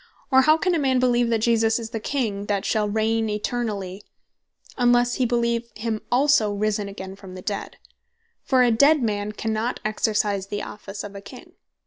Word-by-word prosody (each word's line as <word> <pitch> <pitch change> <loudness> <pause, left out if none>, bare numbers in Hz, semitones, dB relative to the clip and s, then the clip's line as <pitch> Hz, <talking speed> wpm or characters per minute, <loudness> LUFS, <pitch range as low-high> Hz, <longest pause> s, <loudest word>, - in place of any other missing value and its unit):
Or 265 0 +7
how 310 +3 +5
can 365 +2 0
a 335 - +1
man 265 -3 +2
beleeve, 245 -1 +2
that 225 -2 +1
Jesus 225 -1 +3
is 230 -1 -6
the 225 - -3
King 215 -5 -2
that 200 -1 -1
shall 210 -2 +1
reign 220 +1 0
eternally, 210 -3 -3 0.7
unlesse 245 0 +3
hee 255 - +2
beleeve 235 0 0
him 220 0 -3
also 255 -4 +3
risen 205 0 -1
again 190 -1 -8
from 195 -2 -11
the 185 - -8
dead? 205 - -4 0.7
For 255 -2 +3
a 245 - +4
dead 280 +5 +4
man 205 -2 -1
cannot 220 +3 -2
exercise 210 -2 0
the 205 +1 -4
Office 205 -1 -8
of 205 - -8
a 200 - -8
King. - - -12
220 Hz, 180 wpm, -23 LUFS, 205-245 Hz, 0.7 s, Or